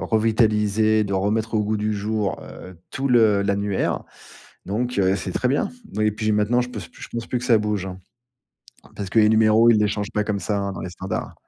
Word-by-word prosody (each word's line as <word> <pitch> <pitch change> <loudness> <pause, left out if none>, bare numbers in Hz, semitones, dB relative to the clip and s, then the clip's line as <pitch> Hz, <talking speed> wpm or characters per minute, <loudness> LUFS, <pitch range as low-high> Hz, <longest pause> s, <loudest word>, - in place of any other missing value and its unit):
revitaliser, 110 -1 +2
de 100 - -4
remettre 110 +4 0
au 105 - +2
goût 105 +1 -1
du 105 +1 -1
jour, 105 0 -2
heu, 90 -2 -11
tout 135 +1 -2
le 110 -5 +4
l'annuaire 100 0 -1 0.6
donc 120 +3 -2
heu, 95 0 +3
c'est 90 -1 -5
très 125 - 0
bien. 145 +9 0 0.3
Oui 105 0 +2
et 105 - +2
puis 110 0 -1
maintenant, 105 +4 +2
je 125 - -2
pens 110 -5 -7
je - - -10
pense 115 0 -5
plus 125 - -1
que 120 - -7
ça 120 -3 +4
bouge, 105 -3 -2
hein, 95 0 -7 1.0
parce 100 -2 -5
que 115 - +2
les 105 - +5
numéros, 110 +1 +5
ils 110 - +4
les 105 - +3
changent 105 +1 -3
pas 105 - 0
comme 105 -2 -2
ça, 105 -2 -1
hein, 100 0 -2
dans - - -7
les 90 - -5
standards. 95 +2 -5
105 Hz, 225 wpm, -22 LUFS, 100-110 Hz, 1.0 s, les